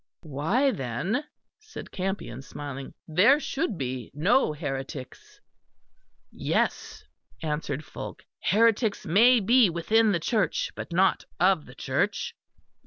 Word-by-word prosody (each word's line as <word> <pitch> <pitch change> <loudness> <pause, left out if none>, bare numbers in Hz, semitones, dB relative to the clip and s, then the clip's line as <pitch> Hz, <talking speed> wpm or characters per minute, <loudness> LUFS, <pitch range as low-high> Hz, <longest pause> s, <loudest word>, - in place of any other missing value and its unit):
"Why, 165 - +1
then," 160 - -2 0.3
said 435 +1 -10
Campion, 190 - -4
smiling, 140 -1 -8
"there 200 - +5
should 275 - -2
be 130 -4 -4
no 180 - +3
heretics." 145 - -6 0.9
"Yes," - - -1 0.4
answered 150 -1 -3
Fulke, - - -8 0.2
"heretics 220 +1 +2
may 230 +9 +6
be 230 +1 +5
within 215 +6 +2
the 175 - +1
Church, 210 +4 0
but - - -7
not 185 +2 +2
of 180 -4 +3
the - - -13
Church." - - -1
185 Hz, 110 wpm, -27 LUFS, 145-230 Hz, 0.9 s, may